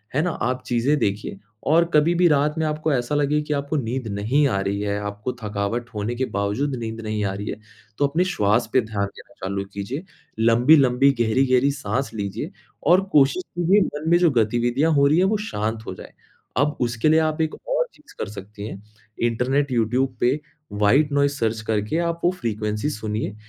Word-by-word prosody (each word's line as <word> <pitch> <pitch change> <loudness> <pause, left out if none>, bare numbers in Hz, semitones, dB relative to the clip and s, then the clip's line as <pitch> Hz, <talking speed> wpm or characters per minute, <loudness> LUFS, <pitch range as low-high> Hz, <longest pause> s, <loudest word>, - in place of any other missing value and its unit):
है 150 - +3
ना? 180 - 0
आप 130 -3 -2
चीज़ें 125 +5 +1
देखिए, 100 -1 -2 0.2
और 165 +5 +4
कभी-भी 170 +4 +4
रात 150 0 +2
में 160 - 0
आपको 155 0 -1
ऐसा 125 +2 -1
लगे 145 +1 +2
कि 150 0 -3
आपको 140 +1 -2
नींद 125 -1 -3
नहीं 110 +8 +1
आ 100 -6 0
रही 100 +1 -2
है, 100 0 -1
आपको 105 +4 -4
थकावट 105 +3 -2
होने 105 +3 -2
के 130 +2 0
बावजूद 115 +8 -1
नींद 115 -2 -5
नहीं 110 -1 -2
आ 95 - -1
रही 100 +1 -6
है, - - -5 0.4
तो 145 - +3
अपने 160 +6 +1
श्वास 105 +3 +2
पर 130 - +5
ध्यान 105 -2 -2
देना - - -14
चालू 100 +1 -2
कीजिए। 120 - -4 0.4
लम्बी-लम्बी 125 +3 +5
गहरी-गहरी 130 +4 +3
साँस 135 -3 -3
लीजिए, 100 -3 -4 0.3
और 180 +4 +5
कोशिश 145 +5 +4
कीजिए 180 +4 +4
मन 150 +2 -4
में 175 - +7
जो 175 -3 +4
गतिविधियाँ 120 +7 +1
हो 140 -1 +4
रही 150 +3 +3
हैं, 185 - +4
वो 210 +2 +2
शांत 110 +2 -3
हो - - -4
जाएँ। - - -12 0.4
अब 145 +3 +1
उसके 120 +4 +1
लिए 160 - +5
आप 155 0 0
1 160 -1 -1
और - - -2
चीज़ 300 0 -19
कर 105 - -3
सकती 105 0 -9
हैं। - - -6
है। 105 +2 -19 0.3
इंटरनेट 130 +4 0
यूट्यूब 125 +3 +1
पे 130 +5 +2 0.3
व्हाइट 135 +9 +3
नोइज़ 140 0 +3
सर्च 115 -5 -1
करके 110 +7 0
आप 170 0 -1
वो 175 - +5
फ़्रीक्वेंसी 110 - -2
सुनिए, 105 -3 -3
125 Hz, 195 wpm, -23 LUFS, 105-150 Hz, 0.4 s, में